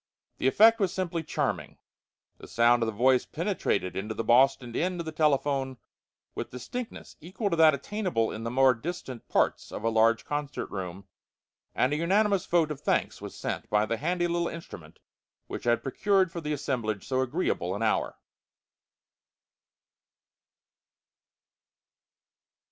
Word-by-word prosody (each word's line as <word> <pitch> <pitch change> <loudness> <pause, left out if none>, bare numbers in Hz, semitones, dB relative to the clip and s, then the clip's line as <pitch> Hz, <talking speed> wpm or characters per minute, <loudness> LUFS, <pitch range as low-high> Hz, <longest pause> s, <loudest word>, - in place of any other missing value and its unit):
The - - +1
effect 225 - +6
was 195 -4 +1
simply 180 -3 -2
charming. 160 - -3 0.6
The - - -11
sound 120 +1 +3
of 115 - +1
the - - -1
voice 125 +4 +3
penetrated 90 - -1
into 105 +3 -4
the - - -2
Boston 125 0 +3
end 180 0 -1
of 170 - -4
the 160 - -4
telephone 140 -3 +1 0.6
with - - -4
a - - -37
distinctness 220 - -7
equal 190 +5 -3
to - - +2
that 160 -2 +6
attainable 175 - -1
in 110 - -6
the 115 - -2
more 130 +1 +4
distant 130 -2 -7
parts - - 0
of - - -6
a 115 - +2
large 115 +1 +3
concert 145 -1 -4
room, 95 0 -6 0.7
and 130 +3 +2
a - - 0
unanimous 195 +3 +2
vote 165 -3 +2
of 140 - -6
thanks - - 0
was - - -8
sent - - -4
by 105 0 +3
the 115 +1 -2
handy 175 +5 0
little 170 0 0
instrument 85 - -9 0.5
which - - -7
had 120 0 +2
procured 190 +6 +1
for 170 - -5
the 150 -1 -4
assemblage 125 -8 -2
so 130 -1 +1
agreeable 130 - -1
an 110 - -3
hour. 110 - 0
135 Hz, 155 wpm, -28 LUFS, 115-170 Hz, 0.7 s, effect